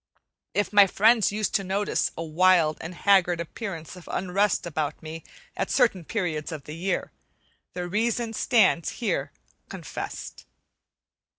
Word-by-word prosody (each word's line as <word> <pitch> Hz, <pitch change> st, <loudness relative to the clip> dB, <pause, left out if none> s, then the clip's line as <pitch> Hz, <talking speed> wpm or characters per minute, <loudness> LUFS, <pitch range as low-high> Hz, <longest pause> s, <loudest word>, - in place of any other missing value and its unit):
If 205 Hz, +1 st, 0 dB
my 205 Hz, -1 st, +8 dB
friends 220 Hz, +3 st, +4 dB
used 215 Hz, 0 st, -2 dB
to 195 Hz, -, +1 dB
notice 195 Hz, +2 st, 0 dB
a 165 Hz, -, -3 dB
wild 165 Hz, -1 st, +3 dB
and 170 Hz, +2 st, -7 dB
haggard 180 Hz, -3 st, +3 dB
appearance 170 Hz, -1 st, -6 dB
of 180 Hz, -, -13 dB
unrest 190 Hz, +1 st, 0 dB
about 155 Hz, -3 st, -3 dB
me 160 Hz, +1 st, -7 dB, 0.3 s
at -, -, -2 dB
certain 190 Hz, -8 st, +2 dB
periods 170 Hz, -7 st, -2 dB
of 155 Hz, -3 st, -6 dB
the 150 Hz, -, -8 dB
year, 185 Hz, +4 st, -2 dB, 0.6 s
the 180 Hz, -1 st, -4 dB
reason 225 Hz, +4 st, -1 dB
stands 210 Hz, -8 st, +2 dB
here 235 Hz, -, -1 dB, 0.4 s
confessed. -, -, -7 dB
185 Hz, 135 wpm, -26 LUFS, 165-205 Hz, 0.6 s, my